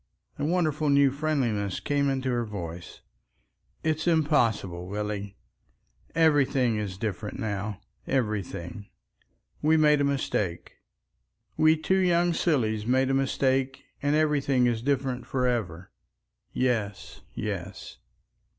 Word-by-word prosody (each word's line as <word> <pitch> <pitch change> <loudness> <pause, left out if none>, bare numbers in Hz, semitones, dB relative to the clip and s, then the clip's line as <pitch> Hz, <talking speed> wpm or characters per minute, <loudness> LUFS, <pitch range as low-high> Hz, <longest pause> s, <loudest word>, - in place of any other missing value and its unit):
A - - -2
wonderful 155 -3 +1
new 140 -1 +5
friendliness 130 -10 -1
came 145 -1 0
into 135 -1 -1
her 120 -1 0
voice. 90 -5 -7 0.8
"It's 155 +1 -1
impossible, 115 - +1
Willie. 100 0 -4 0.8
Everything 140 -7 +3
is 100 -3 -4
different 105 0 -4
now—everything. 105 -2 -4 0.7
We 155 +1 +4
made 150 -2 +4
a - - +3
mistake. 105 -10 -2 0.8
We 155 0 +4
two 190 +5 +1
young 175 -1 +3
sillies 110 - 0
made 130 +1 +2
a - - +1
mistake 135 0 0 0.2
and 145 +1 +1
everything 140 -4 +2
is 120 -2 +1
different 130 -1 -1
for 130 -1 0
ever. 95 -8 -2 0.6
Yes, 110 -6 -2
yes." - - -5
130 Hz, 110 wpm, -27 LUFS, 105-150 Hz, 0.8 s, new